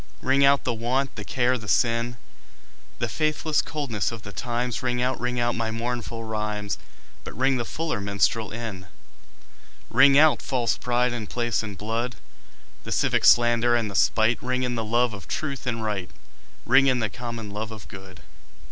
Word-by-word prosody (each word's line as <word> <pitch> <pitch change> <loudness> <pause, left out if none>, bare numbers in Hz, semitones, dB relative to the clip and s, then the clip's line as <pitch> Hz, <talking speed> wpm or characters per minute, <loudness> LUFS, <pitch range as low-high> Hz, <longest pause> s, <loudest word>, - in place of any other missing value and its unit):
Ring 135 +1 +3
out 140 0 +5
the 125 - 0
want, 125 +4 -1
the - - -6
care 125 -1 +1
the 105 - -10
sin, 120 +2 +1 0.8
The - - -1
faithless 155 0 0
coldness 130 - -2
of 115 -3 -8
the 100 - -8
times; 120 +2 -2
Ring 125 -1 -1
out, 125 +1 0
ring 125 0 -1
out 120 0 +1
my 115 -1 -2
mournful 115 0 -4
rhymes, 105 -2 -3 0.4
But - - -9
ring 130 +1 +2
the 120 - -2
fuller 155 -8 -3
minstrel 100 +2 +1
in. 110 -5 -6 1.0
Ring 135 +3 +6
out 155 +1 +5
false 125 -4 0
pride 125 0 0
in 110 -4 -4
place 120 -1 -1
and 105 -3 -7
blood, 115 +4 -2 0.7
The - - -7
civic - - +1
slander 120 0 +5
and 115 -3 0
the - - -8
spite; 110 +4 +3
Ring 125 0 -1
in 125 -1 -1
the 115 -2 -2
love 120 +1 +1
of 95 -7 -9
truth 140 -3 -4
and 115 -2 -1
right, 105 -4 -2 0.6
Ring 130 +3 +5
in 130 -1 +3
the 115 -3 0
common 115 0 -6
love 105 +1 -4
of 110 -2 -10
good. 95 -2 -12
120 Hz, 180 wpm, -25 LUFS, 110-125 Hz, 1.0 s, Ring